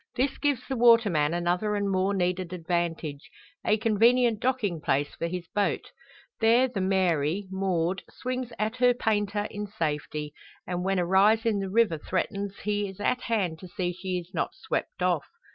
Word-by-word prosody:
This 265 +2 0
gives 285 -4 0
the 265 - -2
waterman 230 -11 +5
another 175 +5 0
and 200 -1 0
more 195 +1 +1
needed 180 -1 -1
advantage 170 -4 -3 0.3
a 215 - +3
convenient 230 +1 +3
docking 220 -10 0
place 145 +1 0
for 170 - -3
his 175 0 -5
boat. 205 -1 -1 0.5
There 235 +3 +5
the 220 -6 -3
Mary, 185 -2 +1
moored, 190 -1 0
swings 255 -1 -4
to 220 -2 -2
her 245 -1 +5
painter 205 -2 0
in 210 0 -5
safety; 150 -4 -3 0.3
and 180 0 -3
when 195 +1 +1
a 180 - +1
rise 205 +5 +4
in 215 -3 +2
the 195 -1 -3
river 205 -6 +2
threatens 200 +3 -3
he 205 -1 -1
is 190 - -12
at 250 +4 0
hand 190 -9 -1
to 185 - -9
see 180 -1 -2
she 180 0 -3
be - - -22
not 165 - -2
swept 390 +5 -3
off. - - +1
195 Hz, 175 wpm, -27 LUFS, 175-225 Hz, 0.5 s, waterman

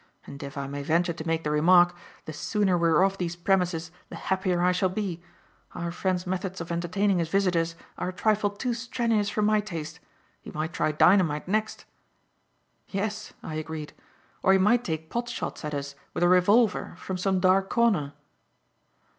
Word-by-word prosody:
And, 140 - -10
if 140 0 -7
I 140 - -3
may 140 +1 -5
venture 170 +4 +1
to 160 0 -7
make 165 0 0
the 150 - -1
remark, 175 +3 +5 0.3
the 155 - -6
sooner 200 +3 +1
we 170 -1 +2
are 160 +3 +4
off 195 0 +1
these 175 -1 -2
premises 175 -2 0 0.2
the - - -8
happier 185 -2 0
I 180 - +4
shall 185 +1 +1
be. 185 -3 -3 0.5
Our 170 -1 -3
friend's 185 +1 -1
methods 185 0 -3
of 165 0 -6
entertaining 180 +3 +1
his 165 -2 -1
visitors 170 -3 +1 0.2
are 180 - -2
a - - -3
trifle 205 +2 +1
too 235 +5 -3
strenuous 230 -3 0
for 210 0 -1
my 215 0 +3
taste. 170 -7 -6 0.4
He - - -10
might 155 +2 -4
try 155 - +1
dynamite 160 -1 +3
next." 215 +3 -1 1.0
"Yes," 210 +2 -4
I 160 - -6
agreed; 155 -1 -5 0.5
"or 190 - +5
he - - +6
might 215 +6 +3
take 160 -3 -4
pot 240 0 -2
shots 245 - -5
at 150 -1 -3
us 140 0 -4 0.2
with - - 0
a - - +5
revolver 200 +5 +3
from 185 -1 -5
some 190 0 +1
dark 190 +1 +3
corner." 200 -12 +2
180 Hz, 185 wpm, -27 LUFS, 165-200 Hz, 1.0 s, he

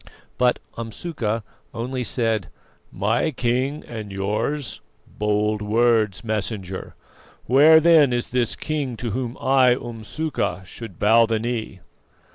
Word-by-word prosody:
But 125 -1 +3 0.2
Umsuka 115 -2 -3 0.3
only 125 +2 -3
said: 115 -4 0 0.4
"'My 110 +9 +1
King 130 +2 -1
and 110 -3 -7
yours'? 105 +9 -2 0.4
Bold 105 0 +1
words, 110 -1 +2
Messenger. 105 -4 -4 0.5
Where 150 +6 +7
then 160 -4 +5
is 120 -1 -2
this 125 -2 0
King 145 -6 -3
to 120 -1 -3
whom 125 +2 -3
I, 130 -2 +4
Umsuka, 115 - -3
should 100 -2 -9
bow 115 +2 +5
the 115 -1 +1
knee?" 110 -4 -4
115 Hz, 115 wpm, -23 LUFS, 105-130 Hz, 0.5 s, Where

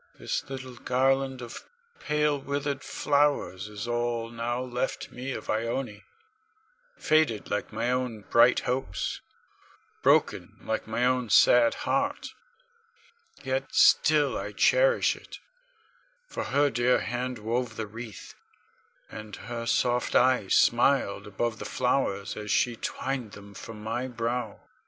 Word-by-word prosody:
This - - -3
little 130 -2 -7
garland 135 +1 +1
of 120 - -8 0.4
pale, 150 -1 +1
withered 140 0 -3
flowers 140 -10 0
is 105 +2 -6
all 120 -1 -1
now 120 +1 -2
left 125 0 -3
me 130 +2 -5
of 110 - -6
Ione, 115 -1 -2 0.9
faded 155 -9 +1
like 105 - -2
my 115 +3 -1
own 125 -4 -2
bright 115 +4 +4
hopes, 130 +2 -3 0.8
broken - - +2
like 110 - -3
my 115 +2 0
own 125 -2 +1
sad 120 +1 +6
heart. 280 +1 -1 1.1
Yet - - -3
still - - +5
I - - -4
cherish - - +3
it, - - -12 0.9
for - - -5
her 145 +1 +2
dear 120 +2 +2
hand 125 +1 -3
wove 115 +2 -2
the 110 - -3
wreath, 110 0 -9 0.8
and 110 -1 -8
her 115 0 -6
soft 125 +1 +1
eyes 125 -6 +3
smiled 120 -5 +3
above 110 +2 -2
the - - -5
flowers 125 -6 -1
as 105 -1 -7
she 120 +3 +2
twined 125 -1 -4
them 100 0 -12
for 115 - -9
my 110 +4 -3
brow. 120 0 -3
120 Hz, 130 wpm, -27 LUFS, 110-130 Hz, 1.1 s, sad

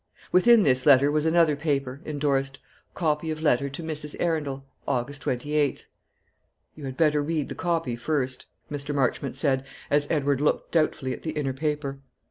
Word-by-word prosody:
Within 220 +4 +6
this 130 -1 +2
letter 140 0 +7
was 155 +1 +1
another 165 -2 +4
paper, 140 -2 -2
indorsed, 140 -3 -1 0.4
"Copy 160 -1 0
of 155 0 -3
letter 140 -3 +2
to 135 +5 -6
Mrs. 150 -2 -5
Arundel, 145 -5 -1 0.2
August 140 +3 -2
28th." 145 +2 0 0.9
"You 150 - -9
had 130 -1 -6
better 150 -2 +3
read 155 -1 -2
the - - -4
copy 165 -8 -1
first," 130 +1 -2 0.2
Mr. 145 0 -3
Marchmont 135 0 0
said, 135 -1 +1 0.3
as 145 0 +3
Edward 145 -3 +1
looked 150 - 0
doubtfully 155 -5 +1
at - - -8
the 155 - -4
inner 145 -4 -1
paper. 145 -1 -2
145 Hz, 160 wpm, -26 LUFS, 135-155 Hz, 0.9 s, letter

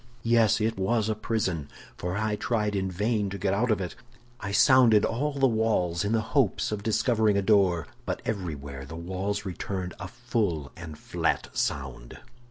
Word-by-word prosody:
"Yes, 115 -2 +4
it 110 -1 -1
was 110 +2 +1
a - - +2
prison, 100 -8 -2 0.3
for 90 +2 -3
I 110 0 0
tried 105 -2 -1
in 95 -1 -1
vain 105 +2 0
to 100 - -5
get 95 0 0
out 120 +5 +1
of 110 - +2
it. 90 -2 -4 0.5
I 100 - -4
sounded 120 -2 +6
all 140 +6 -1
the 135 -1 +2
walls, 110 -7 +1
in 100 - -1
the 115 -1 +2
hopes 135 -9 +2
of 105 -1 -3
discovering 110 -1 +2
a 100 - +1
door, 95 -6 +3 0.2
but - - -3
everywhere 75 -9 -4
the 75 +4 -9
walls 95 +4 -3
returned 95 0 -4
a 90 - -5
full 110 - -2
and 80 -3 -9
flat - - -1
sound. 65 -4 -3
100 Hz, 175 wpm, -27 LUFS, 90-110 Hz, 0.5 s, sounded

